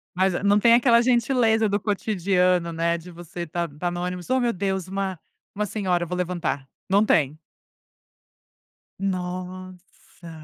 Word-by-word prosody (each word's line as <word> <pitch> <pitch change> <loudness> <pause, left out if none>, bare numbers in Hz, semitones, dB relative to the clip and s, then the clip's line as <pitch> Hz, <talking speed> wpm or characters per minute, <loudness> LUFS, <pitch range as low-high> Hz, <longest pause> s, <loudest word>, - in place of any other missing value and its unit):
Mas, 190 +1 +2
eh, 175 - -3
não 205 +1 +4
tem 230 +2 +5
aquela 235 -1 +5
gentileza 235 -3 +2
do 200 +1 +1
cotidiano, 185 -4 +1
né, 170 +1 0
de 175 +2 -11
você 175 0 -7
tá 170 +2 -3
tá 155 +4 -4
no 175 0 -4
ônibus, 180 +1 -5
"Ô 260 0 +3
meu 240 -1 +1
Deus, 190 -1 -2
uma 190 -2 -3 0.4
uma 210 +1 -1
senhora, 185 -4 -1
eu - - -5
vou 180 +2 -3
levantar", 170 -6 -2 0.2
não 200 +3 +4
tem. 150 -5 +2 1.6
Nossa. 185 -1 -6
185 Hz, 155 wpm, -24 LUFS, 175-205 Hz, 1.6 s, tem